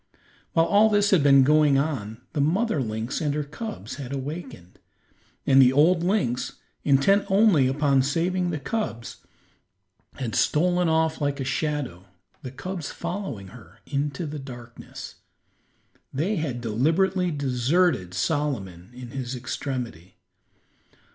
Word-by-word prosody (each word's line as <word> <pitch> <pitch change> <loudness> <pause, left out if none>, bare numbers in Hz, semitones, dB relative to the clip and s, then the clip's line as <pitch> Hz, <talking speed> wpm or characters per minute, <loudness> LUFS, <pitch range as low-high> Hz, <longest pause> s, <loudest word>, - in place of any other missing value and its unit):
While 165 - +4
all 210 +4 +5
this 205 -1 +3
had 185 -6 +5
been 140 -1 +6
going 150 0 +4
on 125 -6 -2
the 145 - 0
mother 180 - +1
lynx 110 +3 -3
and 145 -2 0
her 150 - -1
cubs 145 - -7
had 135 -3 -7
awakened, 140 - -7 0.7
and 135 0 +6
the 125 -1 +6
old 165 +6 +4
lynx, 170 - 0 0.3
intent 150 +9 +4
only 195 -9 +4
upon 140 0 +2
saving 175 +6 0
the 160 - -2
cubs, 130 - -4 1.0
had 120 -4 -4
stolen 175 +2 +2
off 160 0 +1
like 145 0 -1
a - - -1
shadow, 130 - -2 0.4
the 130 - -6
cubs 175 +4 -6
following 140 - -5
her, 115 +1 -15
into 145 +3 -2
the 150 0 -5
darkness. 120 -3 -10 0.9
They 175 +10 -1
had 135 -6 -3
deliberately 165 - +1
deserted 140 - +1
Solomon 100 - -2
in 125 -1 -9
his 130 -1 -4
extremity. 120 - -5
145 Hz, 130 wpm, -25 LUFS, 125-170 Hz, 1.0 s, been